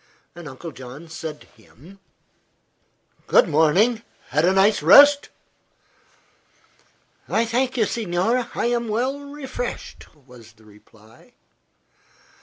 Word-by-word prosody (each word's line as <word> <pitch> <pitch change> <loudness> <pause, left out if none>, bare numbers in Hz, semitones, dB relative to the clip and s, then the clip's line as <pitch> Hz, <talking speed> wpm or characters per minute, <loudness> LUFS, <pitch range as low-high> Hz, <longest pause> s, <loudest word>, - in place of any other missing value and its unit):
Uncle 165 -1 -10
John 130 +4 -12
said 160 -2 -8
to - - -17 0.2
him: 165 - -19 1.3
"Good - - +4
morning. 190 +10 +2 0.3
Had 150 +5 +1
a 180 - +3
nice 195 0 +2
rest?" 285 - +6 2.0
"I 230 - +1
thank 255 +3 -2
you, 220 - +2
signore, 225 +4 -2
I - - -2
am 235 -1 -1
well 250 +6 -2
refreshed," 280 -3 -8
was 125 -5 -18
the 110 0 -24
reply. 105 +1 -21
190 Hz, 105 wpm, -21 LUFS, 145-240 Hz, 2.0 s, rest